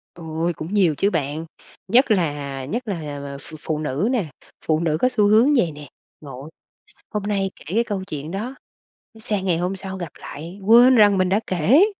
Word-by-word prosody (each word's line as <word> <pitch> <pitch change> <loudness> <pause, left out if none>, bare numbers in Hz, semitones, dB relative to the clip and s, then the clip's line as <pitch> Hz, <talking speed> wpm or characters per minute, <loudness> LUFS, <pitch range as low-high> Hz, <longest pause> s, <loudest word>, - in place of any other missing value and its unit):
Ôi, 165 +1 -2
cũng 160 +6 -7
nhiều 180 -7 +3
chứ 200 - +2
bạn. 150 -2 -2 0.4
Nhất 245 +4 +4
là 145 -8 -1
nhất 235 - -4
là, 155 -7 -4
ờ, 140 0 -6
ph 160 - -13
phụ 155 0 -3
nữ 155 - -1
nè, 235 -8 0 0.4
phụ 155 -1 +2
nữ 160 -2 0
có 255 - +4
xu 215 -5 +2
hướng 230 +8 +5
vậy 175 -9 +2
nè. 145 0 -10 0.3
Ngộ. 135 0 -9 0.6
Hôm 210 -2 -2
nay 200 -1 -1
kể - - -16
cái 230 +2 +3
câu 200 -4 -3
chuyện 155 -4 -6
đó, 215 +8 -4 0.7
sang 205 -3 -2
ngày 175 -3 +2
hôm 180 +3 -1
sau 190 0 -6
gặp 175 -4 -6
lại 170 +6 -9
quên 240 +4 +7
rằng 205 -3 +6
mình 185 -1 +2
đã 200 - +3
kể. 205 - +4
185 Hz, 200 wpm, -22 LUFS, 155-210 Hz, 0.7 s, quên